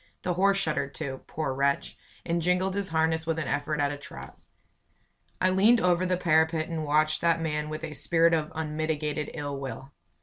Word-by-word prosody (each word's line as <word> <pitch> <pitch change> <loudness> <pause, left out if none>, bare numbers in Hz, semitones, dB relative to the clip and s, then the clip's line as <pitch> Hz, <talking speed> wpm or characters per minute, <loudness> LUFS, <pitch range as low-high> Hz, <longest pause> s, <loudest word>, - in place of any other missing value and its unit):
The 180 - 0
horse 195 +2 +3
shuddered 145 -6 -1
too, 135 -1 -5
poor 155 -4 -3
wretch, 140 +1 0 0.3
and 170 0 0
jingled 180 +2 +1
his 200 -1 -2
harness 160 0 +1
with 165 -1 0
an 155 -4 -2
effort 150 +1 -1
at 145 0 +1
a 145 - -5
trot. 145 - -10 1.0
I 185 - +3
leaned 215 +6 +5
over 180 -1 +2
the 180 0 +1
parapet 160 -1 +2
and 165 -2 -3
watched 155 +1 +2
that 165 -1 +3
man 150 -2 -2
with 155 +1 -6
a 155 -2 -5
spirit 165 +3 +3
of 155 -2 0
unmitigated 155 -1 -2
ill 145 -3 -4
will. 135 0 -7
160 Hz, 190 wpm, -27 LUFS, 150-170 Hz, 1.0 s, leaned